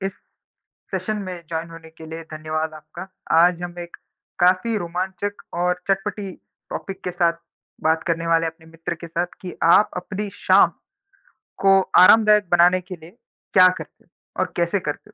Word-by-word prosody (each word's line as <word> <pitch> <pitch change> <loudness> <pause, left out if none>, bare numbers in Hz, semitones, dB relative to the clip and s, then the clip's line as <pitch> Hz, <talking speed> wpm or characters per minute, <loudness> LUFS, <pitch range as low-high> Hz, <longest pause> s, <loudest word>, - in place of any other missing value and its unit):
इस 195 - -2 0.8
सेशन 215 -1 -2
में 180 -2 -7
जॉइन 165 0 -4
होने 165 -1 -12
के 160 0 -13
लिए 160 +1 -7
धन्यवाद 155 0 -3
आपका। 155 +4 -10 0.3
आज 175 0 +2
हम 175 0 -6
एक 175 0 -9 0.4
काफ़ी 185 +5 +3
रोमांचक 190 +3 -4 0.2
और 180 0 0
चटपटी 195 0 -2 0.4
टॉपिक 195 -1 -6
के 180 - -2
साथ 175 -1 +2 0.5
बात 160 0 +2
करने 165 0 -1
वाले 165 0 +2
अपने 160 0 -8
मित्र 165 +1 -6
के 170 0 -10
साथ 170 +1 -2
कि 180 -2 -7 0.2
आप 210 - +5
अपनी 200 +3 -4
शाम 185 -3 +4 0.9
को 195 0 +6 0.2
आरामदायक 210 0 +6
बनाने 175 +1 +5
के 185 +1 -8
लिए 170 +5 -16 0.4
क्या 185 -1 +8
करते 185 0 -5
हो? - - -34 0.3
और - - -2
कैसे 170 +3 +1
करते 190 +3 -6
हो? - - -20
175 Hz, 165 wpm, -22 LUFS, 165-190 Hz, 0.9 s, क्या